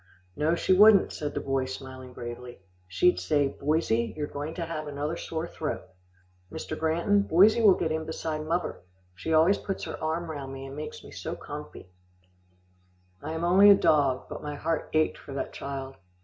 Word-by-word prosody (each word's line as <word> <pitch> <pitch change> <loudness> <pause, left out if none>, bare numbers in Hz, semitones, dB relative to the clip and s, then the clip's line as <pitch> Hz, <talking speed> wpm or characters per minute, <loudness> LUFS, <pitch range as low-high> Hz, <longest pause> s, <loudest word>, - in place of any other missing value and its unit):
"No, 155 +3 +1
she 185 - +2
wouldn't," 205 +1 +7
said 150 -1 -4
the - - 0
boy 135 -1 -1
smiling 130 -1 -8
bravely. 120 0 -8 0.3
"She'd 180 - +3
say, 145 -3 +1
'Boysie, 140 -7 0
you 150 - -2
are - - -2
going 145 +3 -5
to 170 - -3
have 155 -2 -5
another 145 +3 -3
sore 165 -1 -4
throat.' 155 - -5 0.6
Mr. 155 - -5
Granton, 170 +6 +2
boysie 200 +5 +5
will 205 -4 +7
get 160 - -1
in 160 0 -2
beside 160 -1 -4
muvver. 165 +3 -2 0.4
She 95 - -5
always 160 +5 +4
puts 195 - -4
her - - -6
arm 160 +1 -2
round 135 -3 -6
me, 135 0 -7
and 135 0 -8
makes 150 +1 -7
me - - -12
so - - -5
comfy." 90 - -9 1.3
I 155 - -5
am 160 +1 -3
only 190 +4 +7
a 200 - +10
dog, 140 -8 +2
but - - -7
my 150 0 -5
heart 160 +2 -2
ached 155 0 +1
for 140 - -10
that 135 - -4
child. 135 -1 -6
155 Hz, 190 wpm, -27 LUFS, 135-165 Hz, 1.3 s, a